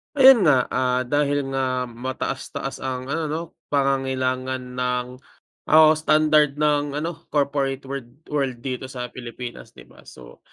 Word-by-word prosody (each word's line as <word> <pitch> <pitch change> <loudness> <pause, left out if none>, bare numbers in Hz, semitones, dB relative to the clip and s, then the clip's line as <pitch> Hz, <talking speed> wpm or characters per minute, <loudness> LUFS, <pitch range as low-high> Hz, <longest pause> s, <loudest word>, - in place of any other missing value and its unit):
Ayun 265 -8 +8
nga, 135 -4 +5
ah, 125 0 +1
dahil 145 +2 +1
nga 130 -2 -1
mataas-taas 125 +3 -5
ang 130 0 -4
ano 160 +2 -1
'no, 155 +2 -2 0.3
pangangailangan 130 -2 0 0.2
ng 125 0 0 0.6
o - - +1 0.2
standard 155 -2 +3
ng 145 -1 +1
ano, 165 +2 -4
corporate 140 -2 0
world 135 +1 -8
world 135 -5 -2
dito 130 0 -4
sa 125 -2 -6
Pilipinas, 120 0 -8
'di - - -13
ba. - - -19
So, - - -14
135 Hz, 135 wpm, -23 LUFS, 125-145 Hz, 0.6 s, Ayun